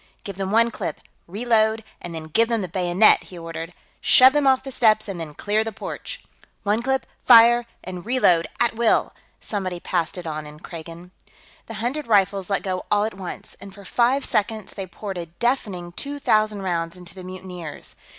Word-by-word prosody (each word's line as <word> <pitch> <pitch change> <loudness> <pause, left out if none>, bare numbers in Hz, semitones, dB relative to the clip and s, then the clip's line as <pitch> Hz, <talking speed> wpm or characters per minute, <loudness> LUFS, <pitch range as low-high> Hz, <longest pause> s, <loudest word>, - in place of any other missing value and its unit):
"Give 200 - -6
them 190 0 -3
one 230 +2 +4
clip, 160 - -5 0.3
reload, 220 +2 +1 0.2
and 170 -1 -6
then 160 - -5
give 190 +9 +2
them 230 -2 0
the 185 - -3
bayonet!" 180 +3 +4
he 180 - -11
ordered. 165 0 -6 0.3
"Shove 260 +1 +7
them 295 -2 +2
off 265 -1 +4
the 270 - -7
steps 220 -3 +3
and 195 -4 -5
then 155 -3 -7
clear 210 +5 0
the 225 - -4
porch!" 215 - -7 0.4
"One 210 +3 +1
clip, 265 +2 0 0.2
fire, 240 0 +7 0.2
and 180 -1 -7
reload, 180 -9 +3
at 240 -1 +2
will!" 230 -1 +2 0.3
somebody 185 -4 -3
passed 170 -1 -2
it 180 - -7
on 155 -1 -5
in 150 0 -12
Kragan. 170 +1 -10 0.6
The 225 - -7
hundred 245 +7 -3
rifles 200 -3 +2
let 195 - 0
go 185 -1 -3
all 205 0 +3
at 220 - -4
once, 190 -1 -8
and 195 -1 -11
for 200 -1 -13
five 250 +7 +2
seconds 215 -1 -1
they 195 -2 -6
poured 195 0 -6
a 170 - -6
deafening 185 -2 -2
two 285 +10 -6
thousand 215 -6 +1
rounds 170 -1 -2
into 180 -1 -12
the 185 - -10
mutineers. 180 -3 -9
200 Hz, 190 wpm, -23 LUFS, 175-230 Hz, 0.6 s, Shove